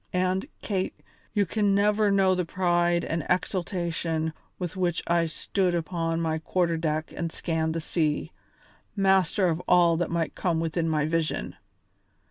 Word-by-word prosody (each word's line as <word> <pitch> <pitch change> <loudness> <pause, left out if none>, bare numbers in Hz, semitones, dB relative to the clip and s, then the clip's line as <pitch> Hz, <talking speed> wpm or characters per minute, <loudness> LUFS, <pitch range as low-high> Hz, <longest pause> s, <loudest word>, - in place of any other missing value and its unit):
And, 185 +5 0 0.2
Kate, 190 -3 -1 0.4
you 205 -2 +2
can 205 +1 +1
never 210 +1 +3
know 195 -1 +4
the 180 -1 0
pride 175 -1 +1
and 165 -1 -2
exultation 170 -3 -1 0.2
with 180 -1 -4
which 175 -3 0
I 170 -1 +2
stood 180 +3 -1
upon 165 -1 -1
my 160 -1 0
quarter 170 +1 0
deck 155 -1 -2
and 165 -1 -3
scanned 160 -1 -1
the 165 - -1
sea, 155 0 -1 0.6
master 190 -1 +3
of 165 0 0
all 170 -2 +5
that 175 0 -1
might 170 -1 -1
come 170 -3 0
within 165 0 -1
my 155 -1 +1
vision. 160 0 -1
170 Hz, 150 wpm, -27 LUFS, 165-185 Hz, 0.6 s, all